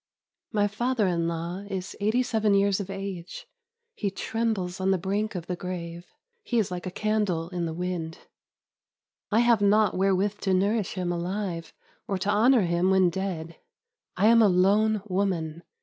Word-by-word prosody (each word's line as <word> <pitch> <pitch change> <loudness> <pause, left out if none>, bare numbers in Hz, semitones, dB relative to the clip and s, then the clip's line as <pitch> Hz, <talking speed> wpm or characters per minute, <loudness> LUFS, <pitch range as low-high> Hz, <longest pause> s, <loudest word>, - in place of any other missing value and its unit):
My 205 -2 +2
father 235 +2 0
in 170 -2 0
law 170 +2 -3
is 190 0 -5
eighty 220 +5 +2
seven 220 -4 +1
years 200 0 +3
of 200 -1 -5
age. 195 -2 -6 0.5
He 205 - -2
trembles 195 -3 -2
on 190 - +1
the 190 - +3
brink 200 +4 -2
of 175 -2 -4
the 180 - -3
grave. 175 -1 -6 0.3
He 240 - -2
is 210 -5 +1
like 180 0 -4
a - - -1
candle 195 -4 -1
in 175 -2 -2
the 160 - -4
wind. 175 -2 -3 1.1
I 220 +2 +3
have 235 -3 +4
naught 210 +1 +4
wherewith 195 +2 +1
to 190 -1 +1
nourish 200 +2 +1
him 180 -2 -1
alive, 175 -1 -3 0.4
or 195 - -1
to 195 +2 -1
honor 235 +4 +5
him 170 +1 +1
when 190 -2 +4
dead. 170 -3 -4 0.6
I 195 - +3
am 230 +1 +7
a 215 - +6
lone 200 +3 +3
woman. 180 -5 -1
190 Hz, 170 wpm, -26 LUFS, 180-210 Hz, 1.1 s, am